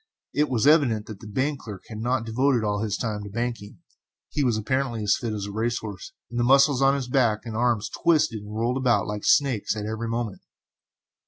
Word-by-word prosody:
It 150 0 +1
was 120 -2 +1
evident 140 -9 +4
that 105 -3 -9
the 110 - -11
bank 135 +7 -1
clerk 105 -4 -9
had 110 -2 -7
not 120 +1 0
devoted 125 +1 +1
all 105 -1 -1
his 105 -2 -1
time 110 -3 -3
to 100 - -7
banking; 115 - -4 0.5
he 145 - -1
was 120 -4 +2
apparently 120 0 -1
as 100 -1 +3
fit 115 -2 -4
as 105 -2 -3
a 100 - -6
race 115 +3 -1
horse, 105 -5 -7 0.2
and 120 - -2
the - - +2
muscles 135 +1 +5
of 135 +1 +4
his 135 -3 -3
back 120 -5 +2
and 115 -2 -5
arms 115 -3 +1
twisted 155 -4 +1
and 105 +1 -8
rolled 120 +3 0
about 125 -3 +2
like 105 0 -4
snakes, 130 -7 +2
at 105 -1 -4
every 110 +2 -3
movement. 115 -3 -3
115 Hz, 220 wpm, -25 LUFS, 105-130 Hz, 0.5 s, muscles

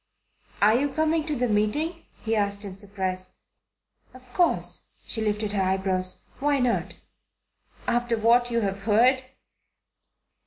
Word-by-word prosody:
"Are 210 +1 +6
you 275 +5 +2
coming 315 +2 +1
to 300 - 0
the 250 -1 0
meeting?" 265 +11 0 0.2
he 225 0 0
asked 200 -1 0
in 190 -2 -7
surprise. 190 -2 -4 0.8
"Of 255 -1 -16
course." 350 -2 +1 0.2
She 225 - -3
lifted 210 -1 -1
her 200 -2 0
eyebrows. 185 -1 -1 0.2
"Why 285 +1 +2
not?" 250 -3 0 0.9
"After 240 -1 +1
what 240 +2 +4
you 235 -1 +1
have 195 -1 -2
heard?" 235 +6 +3
225 Hz, 130 wpm, -26 LUFS, 200-255 Hz, 0.9 s, Are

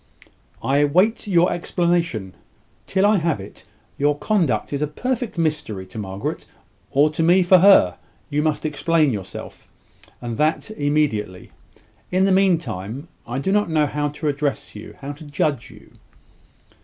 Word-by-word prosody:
"I 140 +2 +2
wait 185 +10 +2
your 175 -2 +3
explanation. 170 - -1 0.5
Till 190 +1 +2
I 210 0 +4
have 165 -6 0
it, 95 +2 -11 0.3
your 145 +1 +2
conduct 150 - 0
is 140 - -2
a 150 - +1
perfect 245 - -3
mystery. 150 - -1
To 95 +4 -9
Margaret, 95 -1 -5 0.4
or 145 +3 +3
to 155 - -2
me 175 +3 +5
for 180 +1 +6
her, 180 - +6 0.3
you 145 +1 0
must 155 0 -1
explain 155 -1 +1
yourself, 95 -3 -8 0.5
and 120 -2 -5
that 155 +7 0
immediately. 145 - -1 0.6
In 185 +1 +2
the 195 - +3
mean 190 -2 +4
time, 120 - -7 0.2
I 120 +2 -3
do 165 +8 -1
not 205 -2 +2
know 155 -2 +2
how 145 0 -2
to 150 +2 -5
address 140 -2 -2
you 105 - -10
how 140 +1 -5
to 145 +2 -11
judge 145 -2 -2
you." - - -16
150 Hz, 155 wpm, -21 LUFS, 135-175 Hz, 0.6 s, for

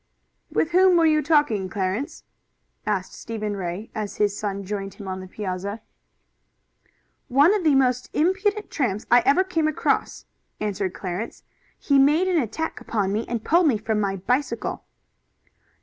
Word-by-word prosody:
"With 320 - 0
whom 365 0 +5
were 335 - +4
you 310 -1 +4
talking, 285 - +2
Clarence?" 195 +7 -3 0.6
asked 195 -3 -1
Stephen 215 -2 -4
Ray 190 +3 -5
as 215 -2 -4
his 205 -1 +1
son 200 -1 -3
joined 195 0 -5
him 200 - -9
on 185 0 -4
the 185 - -8
piazza. 200 +2 -4 1.5
"One 285 +9 +5
of 415 -4 0
the 305 -4 +4
most 250 -2 +2
impudent 390 +6 0
tramps 220 -8 -1
I 245 - +8
ever 285 +7 +5
came 335 -4 0
across," 310 - -1 0.3
answered 200 -3 -2
Clarence. 185 +4 -5 0.3
"He 280 -1 +2
made 300 +7 +4
an 350 -4 +2
attack 320 +7 -4
upon 200 -3 -1
me, 220 +2 -2
and 230 -2 -3
pulled 340 +1 +4
me 250 -7 +3
from 215 0 -1
my 200 -2 0
bicycle." 245 +4 -2
230 Hz, 155 wpm, -24 LUFS, 200-305 Hz, 1.5 s, I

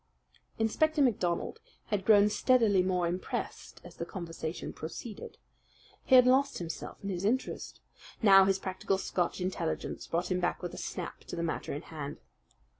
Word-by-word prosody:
Inspector 310 +8 +1
MacDonald 195 -10 +1 0.3
had 195 -2 0
grown 205 -2 +7
steadily 215 -3 +3
more 180 -1 +1
impressed 180 +2 -4
as - - -13
the - - -3
conversation 165 -3 -5
proceeded. 200 +7 -8 0.7
He 260 - +5
had 250 -1 +9
lost 270 +2 +3
himself 165 -2 -6
in 200 - -3
his 180 -1 -3
interest. 245 +6 -2 0.4
Now 195 -3 +7
his 195 0 +2
practical 190 0 -2
Scotch 180 -1 -1
intelligence 180 -3 -3
brought 175 +2 -1
him 180 - +1
back 175 +1 -1
with 175 - -4
a - - -8
snap 180 - -5
to - - -6
the 170 - -2
matter 165 - -3
in 145 +4 -4
hand. 150 -3 -6
190 Hz, 160 wpm, -31 LUFS, 175-220 Hz, 0.7 s, had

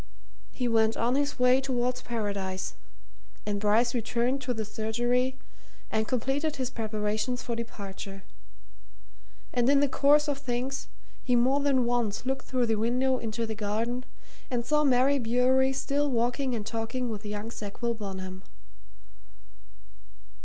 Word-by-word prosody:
He 250 - -2
went 225 -1 +3
on 235 +2 +2
his 285 +1 0
way 250 +1 +5
towards 250 -1 -1
Paradise, 200 -5 -3 0.7
and 205 -1 -1
Bryce 220 +4 +3
returned 245 +3 0
to 255 -1 -2
the 220 -3 -2
surgery 240 +4 0 0.5
and 220 0 +1
completed 275 +5 0
his 260 -2 -2
preparations 215 +2 -2
for 235 - -2
departure. 195 -4 -7 1.3
And 245 0 +3
in 280 0 +6
the 285 - +4
course 290 +2 +4
of 285 -1 -1
things, 260 +1 -2 0.3
he 250 - +2
more 255 +4 +4
than 275 -3 +2
once 240 -2 0
looked 265 0 -2
through 255 -2 +1
the 225 -1 +1
window 250 +4 +2
into 230 +1 -2
the 220 - -3
garden 225 +4 -2 0.5
and 240 -2 -1
saw 300 +3 +3
Mary 270 +1 +4
Bewery 255 +3 +3
still 280 +2 0
walking 245 +1 0
and 215 -2 -4
talking 230 +3 -2
with 215 -1 -5
young 210 +2 -4
Sackville 235 +2 -3
Bonham. 190 -3 -6
240 Hz, 140 wpm, -28 LUFS, 220-260 Hz, 1.3 s, in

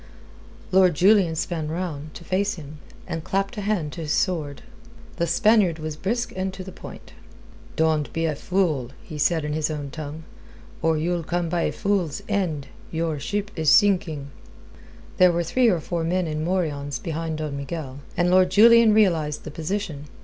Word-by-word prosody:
Lord 185 -3 +5
Julian 190 -2 +4
span 160 -1 -2
round, 155 -2 -5
to - - -9
face 195 +3 0
him, 150 -2 -10 0.3
and 165 -1 -4
clapped 195 +2 -1
a - - -2
hand 195 -8 -1
to 170 - -6
his 150 -2 -3
sword. 155 -7 -1 0.5
The 170 - 0
Spaniard 190 0 +3
was 155 -1 -5
brisk 235 +9 -2
and 190 0 -2
to 190 - -7
the 190 - -9
point. - - -11 0.6
"Don't 155 -2 +1
be 165 0 -1
a 160 - 0
fool," 155 -6 0
he 150 - -8
said 160 +1 +2
in 150 - -2
his 155 0 0
own 145 -3 -4
tongue, 155 +1 -7 0.6
"or 160 -1 +2
you'll 170 +2 0
come 170 +1 -2
by 175 0 0
a - - 0
fool's 185 -8 -1
end. 180 -9 -1 0.2
Your 160 -2 -2
ship 205 +7 -3
is 160 -3 +1
sinking." 160 -8 +3 0.9
There 180 -1 +6
were 170 0 0
three 240 +8 +3
or 180 -5 +2
four 170 +1 -3
men 180 +2 0
in 155 -1 -3
morions 150 -6 -1
behind 165 -1 -4
Don 155 -2 -4
Miguel, 140 -1 -6 0.2
and 175 +1 +2
Lord 185 0 +5
Julian 225 +2 +7
realized 165 -8 +2
the 155 - -7
position. 160 -2 -4
165 Hz, 180 wpm, -24 LUFS, 155-185 Hz, 0.9 s, Julian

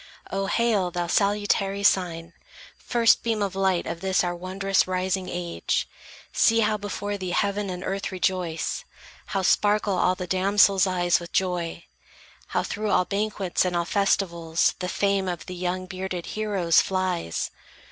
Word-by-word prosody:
O 195 0 -1
hail, 220 -6 +1
thou 175 0 -2
salutary 200 +1 +1
sign, 170 -4 +1 0.4
first 235 0 +3
beam 225 -3 0
Of 195 -1 -3
light 190 -2 +1
of 165 0 -5
this 190 -1 +2
our 175 0 -1
wondrous, 190 +2 0
rising 185 0 -1
age! 175 -1 -2 0.5
See, 225 0 +4
how 215 0 +2
before 205 0 -4
thee 185 -1 -4
heaven 200 +2 0
and 180 0 -5
earth 195 +1 -3
rejoice, 180 -3 -1 0.4
How 195 -1 -1
sparkle 205 +1 +2
all 180 0 +2
the 180 - -5
damsels' 195 +1 +4
eyes 175 -2 +2
with 170 0 -10
joy, 175 -3 -1 0.6
How - - -1
through 215 0 -3
all 180 - +3
banquets 200 -2 -1
and 180 -1 -1
all 170 0 +1
festivals 170 -4 +1
The 180 0 -3
fame 195 -1 +1
of 175 -2 -4
the 185 - -7
young 180 +1 -3
bearded 185 -1 -5
heroes 200 -6 +2
flies! 185 - -2
190 Hz, 155 wpm, -25 LUFS, 180-200 Hz, 0.6 s, See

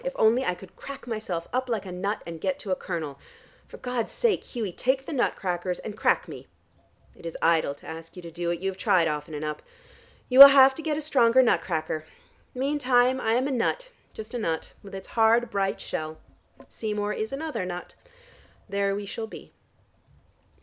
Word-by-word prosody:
If - - -3
only 230 +4 +4
I 180 - 0
could 185 +1 -14
crack 275 0 -9
myself 215 -8 -4
up 255 0 -1
like 220 -4 -1
a 185 - -7
nut 200 +4 -3
and 165 -1 -8
get 280 - -1
to 210 -9 -6
a - - +3
kernel. 155 -7 -5 0.5
For - - -11
God's 250 -3 -3
sake, 465 -4 +1
Hughie, 225 -7 -4
take 265 +8 0
the - - -5
nut 260 - +1
crackers, 180 -1 -2
and 210 - -7
crack - - +1
me. - - -10 0.7
It - - -17
is 165 -1 -6
idle 160 -4 +2
to - - -19
ask 165 +2 -9
you 180 - -9
to 170 - -9
do 170 +1 -3
it. 170 0 -2
You 195 0 0
have 190 - -14
tried 185 -6 +3
often 150 0 -4
enough. 150 0 -4 0.7
You 255 +1 +3
will 280 - +16
have 270 -1 +7
to 320 - -7
get 310 -2 -1
a 310 - -3
stronger 260 -4 +4
nut 240 - +3
cracker. 160 -2 -3 0.5
Meantime 260 -2 +2
I 225 - +1
am 255 +3 +2
a - - -2
nut, - - -1 0.2
just 220 +2 -9
a 245 - -2
nut, 165 -7 -3
with 195 -1 -10
its 190 - -9
hard 230 +1 +3
bright 195 -1 -1
shell. 155 0 -5 0.5
Seymour 210 -1 -3
is 220 +1 -3
another 300 -5 -3
nut. 180 -1 -6 0.7
There 200 -1 0
we 205 0 -4
shall 220 +3 -5
be." - - -12
210 Hz, 205 wpm, -26 LUFS, 175-255 Hz, 0.7 s, will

